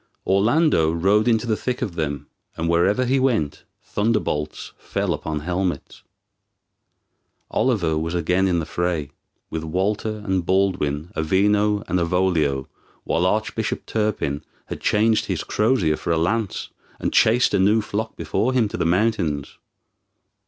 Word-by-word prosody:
Orlando 100 - +3
rode 100 +7 +2
into 115 0 +2
the 110 -2 +1
thick 125 +3 -3
of 95 - -3
them, 75 -4 -3 0.3
and 85 - -1
wherever 95 +9 +2
he 135 +2 +2
went 115 - 0 0.2
thunderbolts 100 -9 -1
fell - - -2
upon 75 -1 -4
helmets. 90 +2 -3 1.5
Oliver 80 - +1
was 80 +2 -3
again 90 +3 +2
in 90 -2 +1
the 80 - -1
fray, 85 -3 -2 0.4
with 80 0 -3
Walter 105 +6 -2
and 95 -3 0
Baldwin, 90 -4 0
Avino 100 +5 +2
and 90 - +1
Avolio, 85 -6 +1 0.4
while 85 +2 +1
Arch 110 +3 0
bishop 110 -2 -3
Turpin 100 -10 -1 0.2
had - - -7
changed 110 +1 +2
his - - -2
crosier 105 -9 +1
for - - -6
a 85 - +2
lance, 105 +5 -1 0.3
and - - -2
chased 115 +2 +4
a 100 - +3
new 105 +4 +4
flock 110 +1 -3
before 130 +4 -1
him 120 -4 +3
to - - -5
the - - 0
mountains. 85 -7 0
95 Hz, 145 wpm, -22 LUFS, 80-110 Hz, 1.5 s, chased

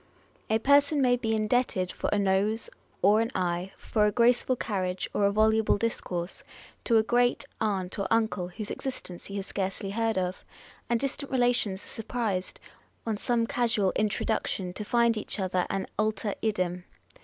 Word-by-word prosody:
1 220 - +2
A - - +2
person 285 +3 +4
may 250 -2 +4
be 225 -2 -1
indebted 215 -4 +1
for - - -3
a 205 - +2
nose 200 +3 +1 0.3
or 210 +3 +6
an 230 - 0
eye, 180 0 -1
for 210 -2 +1
a - - +2
graceful 245 +3 +3
carriage 185 -6 -2
or 205 - +2
a 200 - +4
voluble 220 +1 +3
discourse, 185 -5 -3 0.4
to 230 - +3
a 220 - +4
great 245 +2 +2 0.2
aunt 195 -3 -1
or 200 - 0
uncle, 220 -5 +1
whose 205 +4 -6
existence 250 -9 -6
he 200 - -7
has 195 -1 -3
scarcely 195 0 -3
heard 225 0 0
of; 185 0 -2 0.5
and 235 -1 +2
distant 275 +2 -3
relations 245 -6 +1
are - - -14
surprised, 220 -5 -3 0.5
on 225 -2 0
some 230 +2 0
casual 225 -5 +1
introduction, 195 -3 -1
to 210 - -5
find 235 +1 +3
each 215 - -3
other 185 -1 0
an 195 - -1
alter 215 -1 0
idem. 180 -5 -1
215 Hz, 170 wpm, -28 LUFS, 190-230 Hz, 0.5 s, or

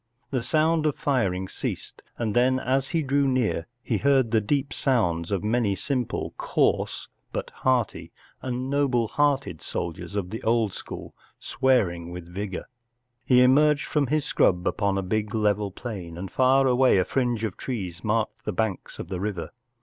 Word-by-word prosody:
The 130 -3 0
sound 155 +4 +2
of 150 - 0
firing 95 -10 0
ceased, - - -5 0.2
and 115 -2 -2
then 130 +2 +3
as 130 +1 0
he 165 -2 0
drew 140 0 +2
near 125 -10 0 0.2
he 110 -5 0
heard 135 -5 +3
the 110 -2 +3
deep 140 +6 -1
sounds 85 - +1
of 100 -1 -1
many 110 -2 +1
simple, 125 +4 -2
coarse, - - 0 0.2
but - - -4
hearty 125 -4 0 0.3
and 130 0 -3
noble 135 -4 +1
hearted 140 - +1
soldiers 100 - -5
of 95 -3 -2
the 110 - -5
old 110 -3 +1
school - - -8 0.3
swearing 95 -11 +1
with 90 -1 -8
vigour. 95 +1 -5 0.6
He 125 -1 +5
emerged 145 +3 +4
from 145 -3 0
his 150 +2 0
scrub 90 -8 +2
upon 100 -1 +1
a 95 - -1
big 105 +3 -1
level 105 -1 +1
plain, 95 -6 -7
and 95 +1 -6
far 130 +1 +4
away 130 -3 +4
a 90 - +3
fringe 120 -4 0
of 105 -4 -2
trees 95 -9 -5
marked 110 0 -1
the - - -2
banks 110 -4 -2
of - - -6
the 90 -1 -4
river. 95 -5 -3
115 Hz, 170 wpm, -26 LUFS, 100-130 Hz, 0.6 s, He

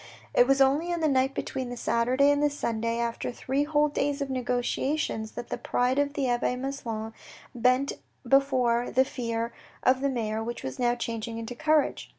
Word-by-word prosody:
It 245 - +5
was 275 0 +3
only 290 +6 +3
on 345 - -1
the 315 - +3
night 270 -1 +2
between 260 -2 -3
the 245 - -6
Saturday 250 +5 +3
and 290 0 +1
the 295 - +4
Sunday, 230 -5 -2
after 235 +1 -2
three 270 +4 -1
whole 300 0 +3
days 285 -1 -1
of 280 -1 -3
negotiations 250 -1 -1
that 240 - -7
the - - -3
pride 250 +2 +1
of 285 0 +1
the 275 -3 0
abbe 245 0 +1
Maslon 235 -4 -4 0.4
bent 255 +3 +2 0.3
before 250 -3 +3
the 260 +1 +3
fear 230 -3 -3 0.3
of 260 +1 +3
the 280 - +1
mayor, 220 -3 -2
which 235 +1 -5
was 130 - -5
now 240 -1 +2
changing 230 -1 -4
into 230 +2 -5
courage. 310 +2 +1
255 Hz, 185 wpm, -27 LUFS, 235-280 Hz, 0.4 s, It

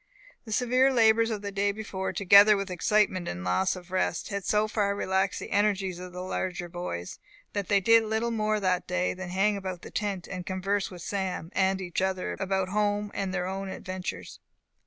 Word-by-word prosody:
The 220 - -9
severe 255 +3 +3
labours 225 -2 +4
of 210 -2 -4
the 200 - -4
day 200 +1 +1
before, 200 -2 -4
together 200 +2 +7
with 195 -1 -4
excitement 185 0 +1
and 90 +1 -4
loss 135 - +1
of 180 0 -11
rest, 185 -2 -1
had 200 -2 -3
so 210 +2 +2
far 205 -2 0
relaxed 190 -1 0
the - - -8
energies 195 -3 +1
of 180 0 -8
the 180 0 -6
larger 180 -1 -3
boys, 170 - -6 0.3
that 200 -2 -2
they 200 - +4
did 225 +2 +5
little 220 +2 -1
more 215 -1 0
that 185 -2 0
day 180 0 0
than 185 -1 -7
hang 195 +3 +2
about 185 -2 -6
the - - -9
tent, 200 -4 -3
and 185 -2 -5
converse 190 +2 -1
with 180 -2 -10
Sam 190 -4 -3
and 190 0 +2
each 180 -1 -3
other 190 -1 -1
about 190 -1 -1
home 205 0 0
and 195 -1 -2
their 180 -1 -1
own 195 +1 -4
adventures. 185 -1 -6
195 Hz, 200 wpm, -28 LUFS, 185-210 Hz, 0.3 s, together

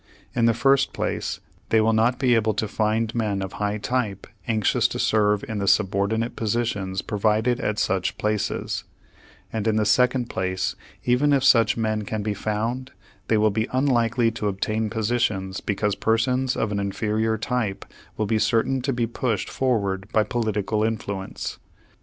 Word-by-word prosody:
In 115 -2 +3
the 115 -1 +3
first 135 +3 +3
place, - - -3 0.3
they 110 - +4
will 110 +1 +3
not 115 +3 +3
be 130 -3 +3
able 110 -2 +2
to 105 0 -1
find 110 +2 0
men 105 -4 -1
of 95 - -6
a - - -9
high 105 0 -1
type 105 -2 -2 0.2
anxious 110 -3 +2
to - - -5
serve 105 -2 +2
in 110 -2 -3
the 100 - -2
subordinate 100 +3 +1
positions 105 -4 -1
provided 110 +3 +1
at 105 0 -1
such 95 -3 0
places; 105 -1 -1 0.7
and 110 -1 -2
in 110 - +2
the 110 -1 +2
second 125 +2 +3
place, 95 -2 -2 0.3
even 125 +4 +3
if 140 -2 +3
such 115 -5 +5
men 110 -1 0
can 105 0 -3
be 105 0 -1
found, 115 +6 -3 0.3
they 110 - +3
will 105 0 +3
be 110 +3 -1
unlikely 120 -3 +2
to 110 -2 -3
obtain 110 +3 -1
positions 105 -4 -1
because 105 0 0
persons 125 +5 +1
of 110 - -1
an 100 - -1
inferior 110 +2 0
type 110 -3 -2 0.3
will 110 - 0
be 110 +1 +1
certain 125 +4 +1
to 135 +2 -1
be 120 -2 0
pushed 115 -2 -2
forward 100 -6 -1
by 110 - +3
political 110 -2 -1
influence. 100 -3 -3
110 Hz, 170 wpm, -24 LUFS, 105-120 Hz, 0.7 s, such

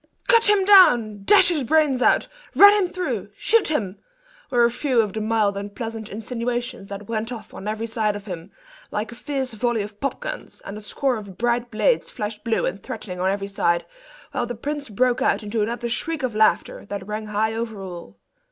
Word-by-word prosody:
"Cut 460 -3 +5
him 405 -2 +4
down!" 245 - +6
"Dash 410 - +6
his 315 -6 0
brains 290 -1 +2
out!" - - +4 0.3
"Run 405 +1 +9
him 410 -3 +2
through!" 365 0 -3
"Shoot 455 -1 +3
him!" 210 -11 -2 0.5
were 240 -2 +4
a 235 - +2
few 250 0 0
of 210 -4 +1
the 220 - -3
mild 215 -2 +1
and 200 0 -6
pleasant 225 -3 -5
insinuations 240 0 -4
that 200 0 -8
went 225 +1 -3
off 235 -3 -8
on 200 - -8
every 215 +1 -2
side 220 -2 -1
of 205 0 -8
him, 180 -2 -7 0.4
like 215 +1 -3
a - - -9
fierce 265 -1 -3
volley 230 -1 0
of 205 0 -10
pop 275 - -2
guns; - - -7
and 200 - -6
a 215 - -8
score 255 +4 -1
of 200 -4 -10
bright 240 0 0
blades 460 - +1
flashed 210 0 -5
blue 230 -1 0
and 195 +3 -3
threatening 185 -4 -7
on 185 +1 +1
every 195 0 -1
side; 170 -3 0 0.5
while 250 -4 -2
the 245 - -5
prince 285 +3 -4
broke 245 +4 +1
out - - +1
into 210 +1 -2
another 235 +3 -2
shriek 300 +6 -3
of 250 -3 -1
laughter, 215 0 +2
that 200 -2 -5
rang 215 +1 -5
high 215 +1 0
over 225 -2 -4
all. 175 - -9
225 Hz, 205 wpm, -23 LUFS, 210-255 Hz, 0.5 s, Run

